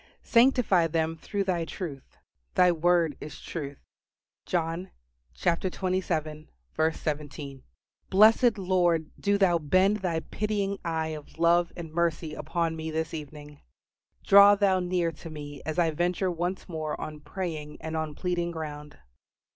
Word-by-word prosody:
"Sanctify 235 Hz, -8 st, +4 dB
them 160 Hz, 0 st, -1 dB
through 200 Hz, +5 st, -3 dB
Thy 180 Hz, -3 st, 0 dB
truth: 160 Hz, -5 st, -7 dB, 0.4 s
Thy 180 Hz, -1 st, +6 dB
word 170 Hz, -2 st, +2 dB
is 150 Hz, -, -8 dB
truth." 145 Hz, -4 st, -6 dB, 0.7 s
John 170 Hz, +1 st, -1 dB, 0.5 s
xvii. 185 Hz, +2 st, 0 dB
17. 155 Hz, -3 st, -4 dB, 0.5 s
Blessed 220 Hz, +3 st, +5 dB
Lord, 175 Hz, -4 st, +1 dB
do 200 Hz, 0 st, +2 dB
Thou 180 Hz, -4 st, +3 dB
bend 185 Hz, +7 st, +3 dB
Thy 175 Hz, -5 st, -1 dB
pitying 200 Hz, +1 st, -2 dB
eye 160 Hz, -1 st, -1 dB
of 155 Hz, -1 st, -9 dB
love 170 Hz, +1 st, +3 dB
and 165 Hz, -3 st, -7 dB
mercy 165 Hz, -2 st, 0 dB
upon 165 Hz, 0 st, -2 dB
me 160 Hz, 0 st, -5 dB
this 160 Hz, +1 st, -3 dB
evening. 150 Hz, -1 st, -9 dB, 0.6 s
Draw 200 Hz, +1 st, +8 dB
Thou 195 Hz, -2 st, +3 dB
near 180 Hz, -2 st, 0 dB
to 165 Hz, +2 st, -11 dB
me 145 Hz, -2 st, -8 dB
as 155 Hz, -, -3 dB
I 170 Hz, -2 st, +3 dB
venture 180 Hz, +3 st, 0 dB
once 175 Hz, +2 st, -3 dB
more 155 Hz, -3 st, -4 dB
on 155 Hz, -1 st, -6 dB
praying 150 Hz, -1 st, -5 dB
and 160 Hz, 0 st, -5 dB
on 155 Hz, -2 st, -3 dB
pleading 175 Hz, 0 st, -1 dB
ground. 150 Hz, -3 st, -7 dB
165 Hz, 135 wpm, -27 LUFS, 155-185 Hz, 0.7 s, Draw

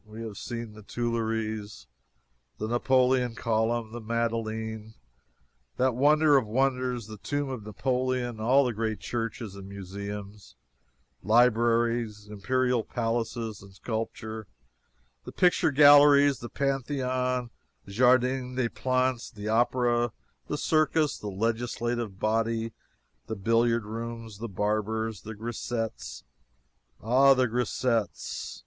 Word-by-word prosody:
We 110 Hz, +1 st, -9 dB
have 110 Hz, -3 st, -7 dB
seen 115 Hz, -2 st, -6 dB
the 110 Hz, -, -12 dB
Tuileries, 110 Hz, -, -3 dB, 0.7 s
the 110 Hz, -, -3 dB
Napoleon 125 Hz, 0 st, +2 dB
Column, 115 Hz, 0 st, 0 dB
the 120 Hz, +1 st, -7 dB
Madeleine, 110 Hz, -1 st, -3 dB, 0.8 s
that 130 Hz, 0 st, +2 dB
wonder 150 Hz, +3 st, +5 dB
of 125 Hz, -5 st, 0 dB
wonders 125 Hz, 0 st, 0 dB
the 110 Hz, -1 st, -10 dB
tomb 145 Hz, +5 st, -2 dB
of 130 Hz, -4 st, -5 dB
Napoleon, 125 Hz, +1 st, -1 dB
all 130 Hz, +5 st, +4 dB
the 125 Hz, -, -1 dB
great 110 Hz, 0 st, -2 dB
churches 115 Hz, -3 st, -4 dB
and 100 Hz, -1 st, -9 dB
museums, 100 Hz, +1 st, -8 dB, 0.7 s
libraries, 115 Hz, -1 st, +2 dB
imperial 125 Hz, +3 st, 0 dB
palaces, 115 Hz, -2 st, -3 dB
and 100 Hz, -1 st, -15 dB
sculpture 110 Hz, -1 st, -5 dB, 0.8 s
and -, -, -10 dB
picture 180 Hz, -3 st, +3 dB
galleries, 145 Hz, -1 st, +7 dB
the 120 Hz, -, -7 dB
Pantheon, 130 Hz, -3 st, -1 dB, 0.4 s
Jardin 125 Hz, +3 st, +2 dB
des 125 Hz, -2 st, 0 dB
Plantes, 130 Hz, -1 st, 0 dB
the 105 Hz, -2 st, -6 dB
opera, 120 Hz, 0 st, +2 dB, 0.3 s
the 150 Hz, -, -2 dB
circus, 155 Hz, 0 st, +1 dB
the 105 Hz, -, -6 dB
legislative 115 Hz, +1 st, -2 dB
body, 115 Hz, +2 st, 0 dB, 0.5 s
the 110 Hz, -, -3 dB
billiard 115 Hz, +2 st, +2 dB
rooms, 115 Hz, -1 st, -6 dB
the 115 Hz, +1 st, -5 dB
barbers, 110 Hz, +2 st, -1 dB
the 110 Hz, +1 st, -8 dB
grisettes 110 Hz, -, -4 dB, 0.8 s
Ah, 135 Hz, +4 st, +5 dB
the 130 Hz, -1 st, +2 dB
grisettes! 115 Hz, -2 st, -2 dB
115 Hz, 115 wpm, -28 LUFS, 110-125 Hz, 0.8 s, galleries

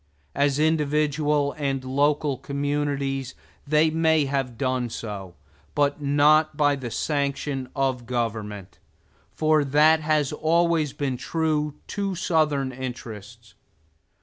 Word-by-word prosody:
As 140 Hz, -1 st, +1 dB
individual 150 Hz, -1 st, +1 dB
and 135 Hz, -2 st, -1 dB
local 140 Hz, +1 st, +1 dB
communities, 140 Hz, -1 st, -2 dB, 0.3 s
they 155 Hz, +2 st, +3 dB
may 160 Hz, -2 st, +3 dB
have 135 Hz, -4 st, -2 dB
done 130 Hz, -1 st, -1 dB
so; 100 Hz, -6 st, -7 dB, 0.4 s
but 145 Hz, 0 st, +1 dB
not 145 Hz, +2 st, +3 dB
by 145 Hz, -1 st, +3 dB
the 130 Hz, -3 st, -6 dB
sanction 140 Hz, 0 st, -2 dB
of 130 Hz, -3 st, -1 dB
government; 110 Hz, -5 st, -4 dB, 0.6 s
for 155 Hz, -1 st, +3 dB
that 150 Hz, +3 st, +4 dB
has 155 Hz, -2 st, +1 dB
always 165 Hz, -2 st, +2 dB
been 135 Hz, -3 st, -3 dB
true 150 Hz, +2 st, -1 dB
to 200 Hz, -2 st, -2 dB
Southern 150 Hz, -6 st, +1 dB
interests. 115 Hz, -3 st, -8 dB
145 Hz, 110 wpm, -24 LUFS, 130-150 Hz, 0.6 s, that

